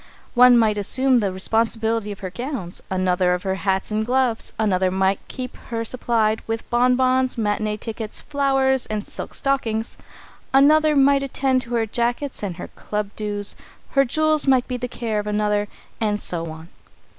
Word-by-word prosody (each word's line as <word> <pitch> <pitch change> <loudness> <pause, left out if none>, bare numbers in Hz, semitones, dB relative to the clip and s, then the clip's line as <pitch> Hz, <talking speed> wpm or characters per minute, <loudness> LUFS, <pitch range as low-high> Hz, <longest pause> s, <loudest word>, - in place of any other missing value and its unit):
One 250 0 +7
might 215 -2 +2
assume 255 +5 +4
the 200 -3 0
responsibility 225 +2 0
of 205 - -9
her 185 -2 -5
gowns, 240 - -5
another 185 -1 +1
of 180 - -6
her 190 -1 -1
hats 190 +1 -1
and 215 +1 0
gloves, 245 -1 0
another 190 -4 +1
might 190 +1 +1
keep 255 -1 -6
her 230 -1 -2
supplied 225 -2 0
with 225 0 -3
bonbons, 255 +1 +2
matinée 215 -1 -1
tickets, 220 -1 -5
flowers, 270 -2 +1
and 215 -1 -3
silk - - -7
stockings, 230 -5 -1 0.6
another 305 +2 +5
might 280 0 +4
attend 265 -1 0
to 240 -1 -4
her 225 -1 +1
jackets 240 +5 -2
and 195 -4 -4
her - - -7
club 210 -1 -4
dues, 205 -1 -3 0.4
her 275 - +4
jewels 310 +3 +2
might 260 -2 +3
be 250 - -3
the 250 0 -3
care 230 -3 -3
of 210 - -5
another, 210 0 0 0.3
and 210 -2 0
so 170 -4 -3
on. 160 +1 -10
225 Hz, 170 wpm, -22 LUFS, 205-255 Hz, 0.6 s, One